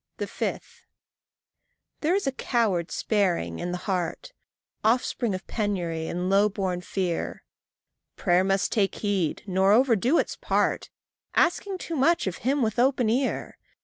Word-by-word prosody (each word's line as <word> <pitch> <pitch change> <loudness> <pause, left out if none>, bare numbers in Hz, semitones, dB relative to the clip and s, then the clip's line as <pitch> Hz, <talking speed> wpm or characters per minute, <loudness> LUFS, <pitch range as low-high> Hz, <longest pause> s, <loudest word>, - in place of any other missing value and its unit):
5. - - -5 1.1
There 325 +4 +2
is 400 - 0
a 270 - +1
coward 220 -10 0
sparing 175 - 0
in 175 - -3
the 180 - -2
heart, 185 - -2 0.5
Offspring 230 -1 +1
of 185 - -7
penury 175 -7 -2
and 180 +1 -2
low 200 +2 +4
born 190 -3 -2
fear: 180 -2 -3 0.7
Prayer 180 -1 +3
must 195 0 +1
take 200 -4 +1
heed 195 -7 -1
nor 190 +1 +3
overdo 245 - +4
its - - 0
part, - - 0 0.5
Asking 380 +3 +2
too 335 -2 -5
much 325 +5 +3
of 190 -2 -3
him 270 +3 0
with 220 0 -1
open 250 -3 +3
ear! 260 +3 -1
205 Hz, 140 wpm, -26 LUFS, 180-250 Hz, 1.1 s, low